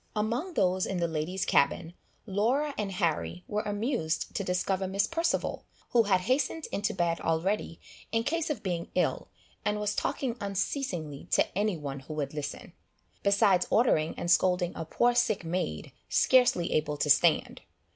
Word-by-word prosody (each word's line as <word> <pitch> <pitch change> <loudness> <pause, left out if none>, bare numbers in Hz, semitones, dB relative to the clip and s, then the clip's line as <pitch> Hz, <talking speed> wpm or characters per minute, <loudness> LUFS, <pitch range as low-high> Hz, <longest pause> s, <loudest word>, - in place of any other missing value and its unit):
Among 240 - -1
those 185 0 +2
in 190 - -2
the 170 -1 +1
ladies' 165 +4 -2
cabin, 160 +4 +2 0.3
Laura 240 +9 +1
and 205 -2 -3
Harry 175 0 -1
were 210 0 -1
amused 205 - -2
to 200 - -2
discover 185 +1 -1
Miss 195 +2 +1
Perceval, 330 +1 -1 0.3
who 240 - +5
had 190 -2 +3
hastened 265 - 0
into 200 0 -1
bed 170 -2 0
already, 165 +2 -1 0.3
in 225 0 +1
case 325 +5 -1
of 265 -8 -3
being 175 -3 -3
ill, - - 0 0.4
and 210 0 0
was 210 0 0
talking 265 -4 -2
unceasingly 190 - -3
to - - +1
any 205 -2 +1
one 140 -2 -5
who 150 +3 -8
would 145 -2 -3
listen, 150 -2 -6 0.5
besides 200 -2 +3
ordering 165 -10 +2
and 175 - -1
scolding 180 -1 +3
a 165 - -4
poor 240 +9 +2
sick 220 -7 +1
maid, 165 - -3 0.2
scarcely 250 -9 +4
able 150 -1 0
to 150 - 0
stand. 160 +3 +3
190 Hz, 160 wpm, -29 LUFS, 170-225 Hz, 0.5 s, who